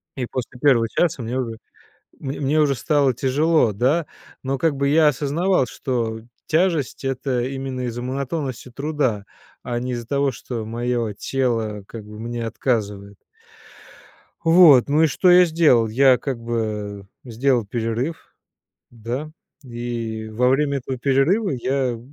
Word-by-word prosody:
И 130 -3 -3
после 125 0 -6
1 125 -5 +4
часа 165 -2 0
мне 120 +2 -3
уже, 115 -3 -4 0.6
мне 135 0 -5
мне 145 +2 +2
уже 145 -2 +3
стало 135 +2 +1
тяжело, 140 0 +2
да? 135 - +1 0.4
Но, 135 0 -2
как 150 +1 +1
бы, 140 0 0
я 155 +1 +5
осознавал, 150 +4 +1
что 115 -4 -3 0.3
тяжесть- 160 -5 0
это 130 -1 -1
именно 135 0 -4
из-за 120 -1 -4
монотонности 130 0 -4
труда, 135 -6 -2 0.4
а 120 -1 -3
не 125 +1 -3
из-за 120 -1 -5
того, 140 +1 0
что 120 -2 -6
моё 120 0 -2
тело, 115 -4 -2
как 110 -1 -9
бы, 105 0 -11
мне 120 0 -4
отказывает. 105 -4 -2 1.3
Вот, 165 -6 +7
ну 150 +3 +3
и - - +5
что 155 +6 +2
я 180 0 +8
сделал? 155 -9 +3
Я, 130 +3 +5
как 130 -3 -4
бы, 105 -4 -4 0.2
сделал 120 0 +1
перерыв, 120 +8 -3 0.6
да, 120 +6 -5 0.3
и 120 -3 -5
во 125 +3 +2
время 140 +1 +1
этого 130 0 -5
перерыва 140 - +2
я 130 -2 -1
130 Hz, 145 wpm, -22 LUFS, 115-140 Hz, 1.3 s, я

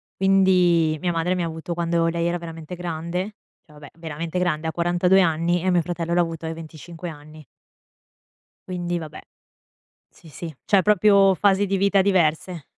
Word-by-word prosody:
Quindi 180 -4 +3
mia 175 - 0
madre 165 +2 0
mi 180 - -2
ha - - -1
avuto 160 +1 -5
quando 170 0 0
lei 170 0 -1
era 175 +1 -1
veramente 165 0 -8
grande, 175 +4 -4 0.3
cioè, 150 - -20
vabbè, 150 0 -13
veramente 165 +2 -5
grande, 160 -3 -1
a - - -1
42 175 +2 +2
anni 170 +1 +1
e 185 - +1
mio 175 -1 +3
fratello 170 0 -3
l'ha 175 - +3
avuto 165 -1 -4
ai 160 - -3
25 165 +2 -9
anni 155 0 -12 1.2
quindi 175 -1 -3
vabbè. 155 -2 -9 0.9
Sì, 165 - -18
sì, 160 +1 -8
cioè 195 -2 +3
proprio 200 -2 +4
fasi 200 +2 +2
di 195 0 0
vita 200 +1 +3
diverse. 175 -3 0
170 Hz, 170 wpm, -23 LUFS, 160-180 Hz, 1.2 s, proprio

